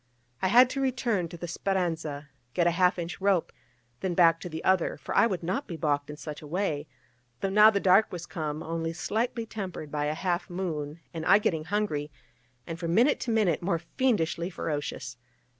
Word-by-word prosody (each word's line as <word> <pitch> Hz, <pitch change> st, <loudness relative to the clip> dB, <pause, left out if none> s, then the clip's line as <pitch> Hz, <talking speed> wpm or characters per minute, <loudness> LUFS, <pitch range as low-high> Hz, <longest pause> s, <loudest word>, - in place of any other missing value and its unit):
I 190 Hz, -, +2 dB
had 245 Hz, +6 st, +7 dB
to 275 Hz, -, -2 dB
return 240 Hz, -9 st, 0 dB
to 170 Hz, -, -9 dB
the 175 Hz, -, -6 dB
Speranza, 165 Hz, -5 st, -2 dB, 0.3 s
get 175 Hz, -, +3 dB
a 175 Hz, -, +4 dB
half 180 Hz, +2 st, +3 dB
inch 175 Hz, +2 st, -5 dB
rope, 195 Hz, -4 st, +2 dB, 0.5 s
then 185 Hz, -2 st, -2 dB
back 165 Hz, -2 st, +5 dB
to 180 Hz, -, -6 dB
the 160 Hz, 0 st, -6 dB
other, 190 Hz, -2 st, +2 dB
for 140 Hz, -, -6 dB
I -, -, +6 dB
would 185 Hz, -6 st, -3 dB
not 190 Hz, +12 st, -2 dB
be 170 Hz, -, -6 dB
baulked 145 Hz, -2 st, 0 dB
in 150 Hz, -, -7 dB
such 150 Hz, -1 st, -7 dB
a 150 Hz, -, -10 dB
way, 155 Hz, -3 st, -2 dB, 0.5 s
though 195 Hz, -, 0 dB
now 210 Hz, +2 st, +8 dB
the 200 Hz, -2 st, +1 dB
dark 195 Hz, +3 st, +4 dB
was 175 Hz, -1 st, -6 dB
come, 155 Hz, -3 st, -4 dB
only 165 Hz, 0 st, -3 dB
slightly 225 Hz, +7 st, -2 dB
tempered 185 Hz, -9 st, -6 dB
by 150 Hz, -1 st, -1 dB
a 150 Hz, +1 st, -1 dB
half 175 Hz, +3 st, -1 dB
moon, 165 Hz, -4 st, -4 dB
and 160 Hz, -, -4 dB
I 195 Hz, -, +8 dB
getting 160 Hz, -7 st, -1 dB
hungry, 165 Hz, -8 st, -1 dB, 0.6 s
and 165 Hz, 0 st, -6 dB
from 170 Hz, 0 st, -1 dB
minute 250 Hz, +7 st, +4 dB
to 240 Hz, -, -2 dB
minute 210 Hz, -8 st, +2 dB
more 170 Hz, -1 st, 0 dB
fiendishly 170 Hz, -2 st, 0 dB
ferocious. 145 Hz, -7 st, -4 dB
175 Hz, 200 wpm, -28 LUFS, 160-195 Hz, 0.6 s, now